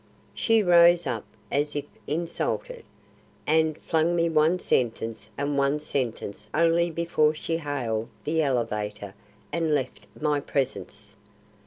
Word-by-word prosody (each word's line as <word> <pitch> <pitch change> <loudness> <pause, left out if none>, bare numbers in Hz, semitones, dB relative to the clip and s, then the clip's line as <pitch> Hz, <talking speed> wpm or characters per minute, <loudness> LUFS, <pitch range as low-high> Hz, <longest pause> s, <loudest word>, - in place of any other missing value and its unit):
She 225 -2 +3
rose 175 -1 +6
up 120 -5 -3 0.3
as 145 +1 0
if 145 - -2 0.2
insulted, 175 - -3 0.6
and 160 0 +2
flung 165 +2 +1
me 170 0 +2
one 160 +2 +3
sentence 115 -7 -1
and 140 0 0
one 140 +2 +2
sentence 115 -8 -4
only 170 +1 +3
before 160 -2 +1
she 165 +1 -2
hailed 125 -8 -2
the 160 +2 +1
elevator 105 -7 -2 0.4
and 165 -2 +1
left 130 -3 -4
my 150 -1 +1
presence. 105 -7 -3
150 Hz, 125 wpm, -26 LUFS, 125-165 Hz, 0.6 s, rose